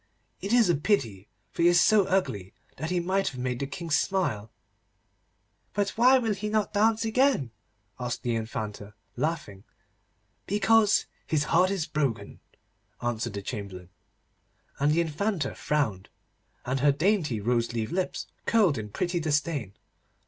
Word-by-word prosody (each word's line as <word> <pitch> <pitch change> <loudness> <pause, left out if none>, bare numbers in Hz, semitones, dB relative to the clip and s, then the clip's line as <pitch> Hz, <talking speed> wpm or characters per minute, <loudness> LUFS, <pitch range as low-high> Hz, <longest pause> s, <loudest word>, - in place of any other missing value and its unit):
It 200 - -4
is 240 -3 +5
a 175 - +4
pity, 120 - 0 0.2
for - - -4
he 170 - +6
is 175 0 +5
so 210 +1 +5
ugly 145 - -1 0.2
that 160 +4 -4
he 180 0 +1
might 190 +3 0
have 130 - -4
made 125 -1 -2
the 140 - -2
King 170 +2 -7
smile.' 145 - 0 1.3
'But 205 0 +1
why 255 +3 +5
will 225 -4 0
he 210 +2 -4
not 215 -1 0
dance 220 +2 +2
again?' 225 - +2 0.5
asked 125 -1 -4
the 120 - 0
Infanta, 110 -2 -5 0.2
laughing. 135 -9 -3 0.8
'Because 210 +1 +3 0.2
his 155 -2 +1
heart 180 +4 +3
is 190 -5 -1
broken,' 135 - -2 0.6
answered 120 -2 -2
the 100 -1 -5
Chamberlain. 95 -5 -6 0.9
And 145 +2 +3
the 165 +2 +3
Infanta 170 +3 -1
frowned, 115 -11 -1 0.6
and 130 +2 -1
her 145 +2 +4
dainty 155 - +1
rose 115 +2 0
leaf 115 -2 -3
lips 185 +1 -2 0.2
curled 195 - +3
in 105 -1 -6
pretty 175 - -1
disdain. 145 - -1
155 Hz, 150 wpm, -27 LUFS, 115-195 Hz, 1.3 s, he